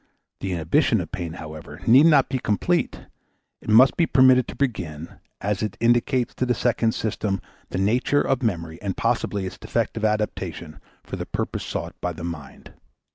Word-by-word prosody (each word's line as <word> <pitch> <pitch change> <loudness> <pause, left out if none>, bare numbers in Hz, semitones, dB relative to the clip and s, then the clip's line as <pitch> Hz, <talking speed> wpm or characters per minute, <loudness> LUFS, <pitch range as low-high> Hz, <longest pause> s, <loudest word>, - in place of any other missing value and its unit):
The 95 -2 -3
inhibition 80 -2 +2
of - - -5
pain, 85 -2 -4
however, 75 -1 -9
need 135 +7 +7
not 145 -5 +5
be 130 -1 -2
complete; 170 - 0 0.6
it - - -9
must 120 +5 +6
be 170 - +3
permitted 130 -1 +5
to - - -7
begin, 85 - -3 0.2
as 100 -1 -1
it 105 - -3
indicates 120 +2 +2
to 130 - -1
the 125 - +2
second 115 -1 +1
system 105 -2 -2 0.3
the - - -4
nature 120 +9 +2
of 135 - +1
the 120 - +1
memory 85 -5 -4
and 100 -2 -3
possibly 115 -4 0
its 95 - -7
defective 115 -1 -2
adaptation 95 -7 -2 0.2
for - - -6
the - - -5
purpose - - -3
sought - - -4
by 90 - -2
the 85 +1 -9
mind. 85 -5 -8
105 Hz, 180 wpm, -24 LUFS, 85-125 Hz, 0.6 s, need